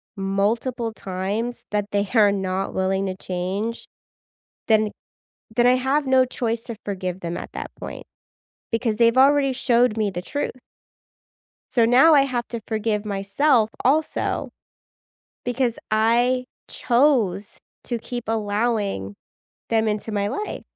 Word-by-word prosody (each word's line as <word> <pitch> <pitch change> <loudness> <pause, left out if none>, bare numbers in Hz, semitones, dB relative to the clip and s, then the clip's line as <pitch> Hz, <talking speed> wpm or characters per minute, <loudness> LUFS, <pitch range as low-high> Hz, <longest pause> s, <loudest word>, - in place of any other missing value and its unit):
multiple 220 +4 -1
times 200 +6 -4
that 205 -1 0
they 200 -1 0
are 210 -4 +5
not 190 -1 -2
willing 190 +1 0
to 185 - -3
change, 190 +5 -4 0.8
then 215 -1 +3 0.7
then 240 - +4
I 250 +1 +5
have 270 +3 0
no 260 -1 +4
choice 235 -2 -2
to 230 - -6
forgive 185 -2 -4
them 170 0 -4
at - - -8
that - - -6
point, - - -7 0.7
because 225 -2 0
they've 230 +1 +4
already 275 0 +5
showed 240 -3 +2
me 210 -2 +1
the 175 -1 -4
truth. 285 +10 -3 1.2
So 235 -2 +4
now 260 +7 +6
I 285 - +7
have 245 -3 -2
to 235 -2 -5
forgive 215 -1 -1
myself 215 +4 +2
also, 300 +5 +1 1.0
because 245 -1 0 0.2
I 240 +4 +3 0.2
chose 235 -7 +1 0.3
to 240 - -2
keep 240 +1 -6
allowing 205 - -1 0.5
them 220 -1 +2
into 210 +1 -3
my 205 -1 0
life. 420 - -4
225 Hz, 135 wpm, -23 LUFS, 200-245 Hz, 1.2 s, I